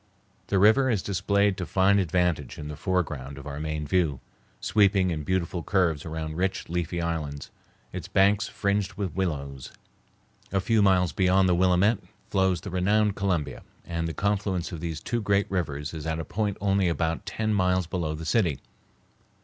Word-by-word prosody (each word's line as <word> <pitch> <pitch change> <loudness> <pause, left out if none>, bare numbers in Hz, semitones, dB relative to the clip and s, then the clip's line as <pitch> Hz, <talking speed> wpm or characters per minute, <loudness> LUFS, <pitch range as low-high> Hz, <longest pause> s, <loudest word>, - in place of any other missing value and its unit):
The 100 - +1
river 110 +7 +5
is 110 -6 0
displayed 100 +1 +1
to 90 - -3
fine 95 +2 +3
advantage 90 -5 0
in 75 - -6
the 75 - -5
foreground 75 -6 -2
of 70 - -9
our 70 -1 -5
main 75 0 -3
view, 75 -5 +1 0.4
sweeping 100 -2 +3
in 80 -2 -2
beautiful 90 +2 -1
curves 85 -7 +1
around 80 0 -4
rich, 95 +1 -1
leafy 85 0 -2
islands, 80 -4 -3 0.4
its - - -5
banks 100 +2 +3
fringed 100 -1 -1
with 95 -3 -4
willows. 70 -8 -3 0.8
A 95 - +2
few 110 +3 +2
miles 95 -3 +3
beyond 95 0 +3
the 90 - +3
Willamette 95 +4 +3 0.3
flows 95 -3 +2
the 95 - -7
renowned 100 +3 +2
Columbia, 90 -6 -1 0.2
and 85 -1 -2
the 80 - -4
confluence 100 -3 -1
of 85 - -5
these 80 -1 -4
two 120 +5 -2
great 100 -1 +2
rivers 75 -6 -2
is 80 -1 -6
at 80 0 -1
a 80 - -4
point 105 +2 -2
only 95 -2 +2
about 85 +2 -1
ten 110 +1 -1
miles 90 -2 +2
below 85 -2 -2
the 80 +1 -7
city. 85 - +1
90 Hz, 175 wpm, -26 LUFS, 80-100 Hz, 0.8 s, river